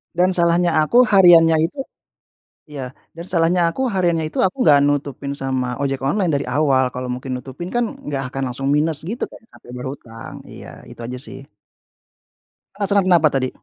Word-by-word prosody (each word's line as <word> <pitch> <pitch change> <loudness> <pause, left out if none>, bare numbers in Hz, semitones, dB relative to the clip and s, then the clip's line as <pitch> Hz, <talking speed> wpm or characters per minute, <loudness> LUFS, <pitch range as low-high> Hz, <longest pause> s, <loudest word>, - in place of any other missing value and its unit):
Dan 180 +2 +3
salahnya 170 0 +2
aku 245 +10 +4
hariannya 175 -5 +6 0.2
itu 285 - -13 0.9
iya, 145 -2 -7 0.3
dan 170 +1 -8
salahnya 175 0 +2
aku 215 - -8
hariannya 170 -4 +1
itu - - -6
aku 185 - -4
nggak 145 -3 +6
nutupin 140 -1 -3
sama 130 -2 -2
ojek 135 -1 -2
online 170 +5 0
dari 140 - -2
awal, 135 -1 +2
kalau 125 0 -4
mungkin 130 +2 -6
nutupin 135 +7 -8
kan 240 0 +2 0.2
nggak 140 -2 -2
akan 135 - -4
langsung 135 +3 -4
minus 155 0 +1
gitu 225 +7 -5
kan - - -13
sampai - - -16
berhutang, 125 -3 -9 0.2
iya - - -12
itu - - -13
aja 125 +1 -6
sih. 130 - -10 1.4
Penasaran 200 -1 +1
kenapa 175 -4 +4
tadi? 135 -3 -1
150 Hz, 165 wpm, -20 LUFS, 135-175 Hz, 1.4 s, hariannya